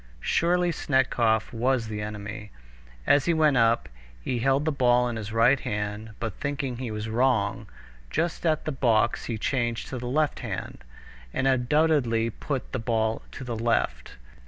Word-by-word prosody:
Surely 175 - +2
Snetkov 120 -7 +1
was 120 0 +1
the 105 -1 -4
enemy. 105 0 -6 0.6
As 145 -1 +4
he 170 - +2
went 155 -3 +4
up, 115 0 +3 0.3
he 120 - -2
held 135 +4 +2
the 160 - +2
ball 125 -3 +3
in 120 - -3
his 110 -1 -5
right 120 +4 +4
hand, 105 0 -4
but 115 -3 -3
thinking 140 -3 -3
he 125 -1 -4
was 105 0 -4
wrong, 115 -3 +1 0.4
just 170 - -1
at 155 -2 +1
the 155 - -1
box 115 -4 +1
he 115 - -3
changed 120 0 -1
to 130 - -4
the 120 - -5
left 150 +3 +1
hand, - - -6 0.5
and 135 - 0
undoubtedly 130 -3 +2
put 135 +4 -4
the 130 - -2
ball 110 -1 0
to 130 - -7
the 120 -2 -4
left. 110 - -1
120 Hz, 165 wpm, -26 LUFS, 110-135 Hz, 0.6 s, As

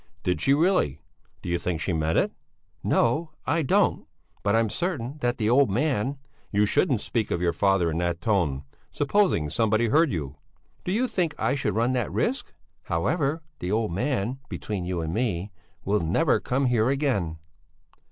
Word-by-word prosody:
"Did 90 -4 0
she 135 +10 +4
really? 165 - +2 0.4
Do - - -4
you 85 0 0
think 90 -3 -2
she 90 - -1
meant 80 0 0
it?" - - +2 0.5
"No, 150 +8 +2 0.2
I 165 +2 +1
don't! 135 - +2 0.3
But 100 +1 +2
I'm 115 0 +3
certain 150 - -3
that 120 -3 0
the 105 - 0
old 130 +3 +4
man...." 130 +3 0 0.3
"You 105 0 +3
shouldn't 125 - +2
speak 115 -3 -1
of 85 - -1
your 85 -1 +1
father 95 -2 +2
in 80 - -2
that 85 -1 -1
tone! 85 -11 0 0.3
Supposing 145 - +1
somebody 110 +5 +2
heard 155 +4 +4
you!" 75 -6 -4 0.5
"Do 180 - -2
you 240 +6 +1
think 175 -8 -1
I 115 +4 +1
should 125 -8 -1
run 120 +3 +2
that 125 -1 -1
risk? 260 +4 -1 0.3
However, 155 -1 0 0.2
the 90 - -3
old 110 -2 0
man 125 - -1
between 100 -4 -4
you 90 -1 -2
and 80 0 -3
me 105 -4 -1 0.3
will 105 +2 +2
never 95 - +2
come 135 +2 0
here 120 -1 +2
again." 130 - 0
110 Hz, 175 wpm, -26 LUFS, 90-140 Hz, 0.5 s, she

